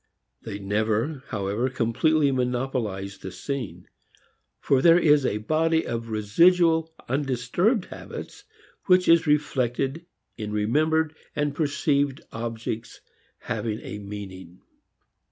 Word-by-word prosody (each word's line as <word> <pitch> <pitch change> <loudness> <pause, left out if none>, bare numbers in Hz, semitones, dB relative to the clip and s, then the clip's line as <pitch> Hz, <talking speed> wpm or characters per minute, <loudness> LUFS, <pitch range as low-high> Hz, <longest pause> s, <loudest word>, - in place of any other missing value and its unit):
They 100 - -6
never, 110 +8 -1
however, 105 +5 -1
completely 135 +5 +2
monopolize 125 -7 -2
the 95 - -7
scene; 135 +2 -5 0.7
for 135 -1 +2
there 170 +2 +7
is 150 -5 +4
a 105 - -1
body 160 +8 +1
of 115 0 -4
residual 160 - +3 0.2
undisturbed 140 - 0
habits - - -9 0.4
which 180 -1 +5
is 165 -1 +5
reflected 140 0 0 0.3
in 105 -2 -5
remembered 155 +9 +1 0.2
and 145 -1 0
perceived 145 -2 0
objects 115 -1 -5 0.4
having 110 -1 -3
a 105 - -7
meaning. 95 -3 -9
130 Hz, 105 wpm, -25 LUFS, 110-155 Hz, 0.7 s, there